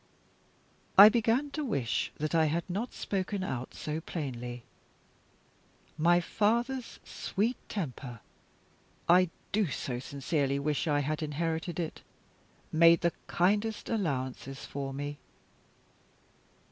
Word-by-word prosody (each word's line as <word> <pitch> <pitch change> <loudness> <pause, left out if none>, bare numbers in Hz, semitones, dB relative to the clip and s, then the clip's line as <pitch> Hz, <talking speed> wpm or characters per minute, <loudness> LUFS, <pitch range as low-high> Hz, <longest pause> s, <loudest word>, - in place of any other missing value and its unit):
I 200 +2 +12
began 235 +5 +1
to 305 +1 -3
wish 140 - -1
that 155 +1 -2
I 160 -1 +4
had 165 +3 -1
not 205 +7 -3
spoken 195 0 -2
out 130 -7 -4
so 155 +1 -3
plainly. 125 -7 -5 1.3
My 170 +3 +4
father's 235 +7 0
sweet 220 +6 -1
temper 130 - -5 0.9
I 180 +1 +6 0.2
do 210 -2 +2
so 125 -3 -3
sincerely 140 +1 -1
wish 145 +2 -1
I 145 -1 +2
had 150 +3 -2
inherited 160 +2 -2
it! 165 -2 -4 0.7
made 165 +1 +6
the 170 -1 +2
kindest 210 +5 +1
allowances 135 - -2
for 135 -1 -4
me. 145 +1 -5
165 Hz, 110 wpm, -30 LUFS, 140-205 Hz, 1.3 s, I